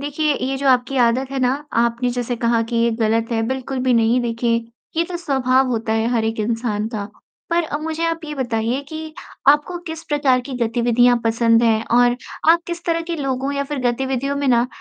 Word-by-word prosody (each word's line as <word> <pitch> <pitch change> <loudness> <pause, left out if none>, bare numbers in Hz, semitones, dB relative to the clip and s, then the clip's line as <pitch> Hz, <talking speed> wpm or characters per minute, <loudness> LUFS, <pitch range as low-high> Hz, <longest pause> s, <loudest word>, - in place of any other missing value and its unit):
देखिए 295 +1 0
ये 270 0 -1
जो 275 0 0
आपकी 255 +1 +2
आदत 255 +3 0
है 275 - -3
ना 250 0 +3 0.3
आपने 235 +1 0
जैसे 245 0 -3
कहा 230 0 +1
कि 230 +1 -4
ये 235 0 +3
गलत 225 +1 +1
है 225 -1 +1
बिल्कुल 260 +1 -3
भी 255 -1 +3
नहीं 230 +2 +3
देखिए, 230 -1 0 0.3
ये 335 - +2
तो 355 0 -5
स्वभाव 265 -5 +1
होता 225 -2 -1
है 225 +1 +1
हर 230 -2 +1
एक 225 0 -2
इंसान 220 -1 -1
का। 210 -3 -5 0.4
पर 340 +1 +2
अ, 300 - -3
मुझे 320 +1 -3
आप 330 0 -1
ये 300 -1 -5
बताइए 240 -1 -1
कि 315 0 -7 0.3
आपको 295 +5 +4
किस 320 0 -6
प्रकार 285 -4 +2
की 265 +2 -9
गतिविधियाँ 240 +1 +3
पसंद 230 0 +3
है 225 -2 +3
और 245 0 +4 0.3
आप 340 +1 +4
किस 345 0 -6
तरह 335 -1 0
के 335 - -1
लोगों 270 -1 -2
या 280 0 -1
फिर 290 0 -4
गतिविधियों 265 +2 -2
में 285 0 -1
ना 240 -1 +3
250 Hz, 210 wpm, -20 LUFS, 230-285 Hz, 0.4 s, आपको